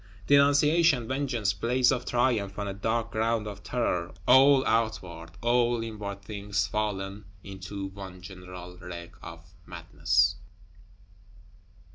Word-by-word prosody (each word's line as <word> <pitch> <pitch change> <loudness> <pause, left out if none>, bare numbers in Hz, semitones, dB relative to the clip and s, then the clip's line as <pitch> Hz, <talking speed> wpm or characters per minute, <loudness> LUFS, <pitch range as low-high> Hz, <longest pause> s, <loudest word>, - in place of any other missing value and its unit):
Denunciation, 145 -1 +4
vengeance; 130 -7 -1
blaze 125 +5 +2
of 125 -2 -2
triumph 115 -5 0
on 100 -1 -3
a 100 - -3
dark 115 +3 -2
ground 110 0 0
of 105 -1 -7
terror; 105 -6 -1 0.2
all 135 +1 +6
outward, 95 -7 -1
all 120 -1 +2
inward 105 -3 -6
things 100 -2 -2
fallen 100 -1 -3 0.2
into 95 0 -7
one 95 -1 -9
general 90 -1 -10
wreck 85 -1 -8
of 85 +1 -11
madness! 85 +3 +1
105 Hz, 115 wpm, -28 LUFS, 95-120 Hz, 0.2 s, all